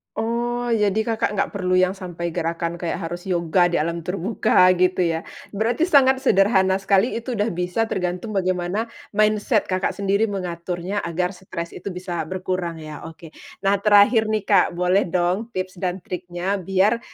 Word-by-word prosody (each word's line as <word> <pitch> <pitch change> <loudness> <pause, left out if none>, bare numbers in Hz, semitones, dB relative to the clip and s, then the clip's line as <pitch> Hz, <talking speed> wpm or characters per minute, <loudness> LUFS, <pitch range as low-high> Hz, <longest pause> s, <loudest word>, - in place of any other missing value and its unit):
Oh, 240 +1 -1
jadi 210 -3 +2
Kakak 225 -2 0
nggak - - +1
perlu 185 -2 -2
yang 185 +1 +2
sampai 175 -3 -5
gerakan 170 0 -2
kayak 170 0 -3
harus 175 +1 -6
yoga 175 -1 +1
di 170 - +1
alam 170 +1 -2
terbuka 185 0 +2
gitu 185 +1 +1
ya. 165 0 -2 0.3
Berarti 235 - +1
sangat 265 -5 +5
sederhana 195 -6 +3
sekali. 195 +4 +2
Itu 235 +2 -4
udah 210 -2 0
bisa 180 +4 -1
tergantung 185 +3 -3
bagaimana 185 +4 -1 0.2
mindset 215 -2 +2
Kakak 185 +1 0
sendiri 200 +2 +1
mengaturnya 180 0 -3
agar 180 +1 -2
stres 175 -3 -7
itu 180 - -9
bisa 180 -1 -4
berkurang 185 -1 -3
ya? 155 -1 -8
Oke. 165 0 -12 0.3
Nah, 195 0 +2
terakhir 210 +2 +5
nih, 215 -1 0
Kak. - - +3
Boleh 180 +2 +2
dong 180 +5 0
tips 185 -1 -4
dan 180 -1 -3
triknya 180 +2 -3
biar, 195 +5 +2
185 Hz, 160 wpm, -22 LUFS, 175-210 Hz, 0.3 s, sangat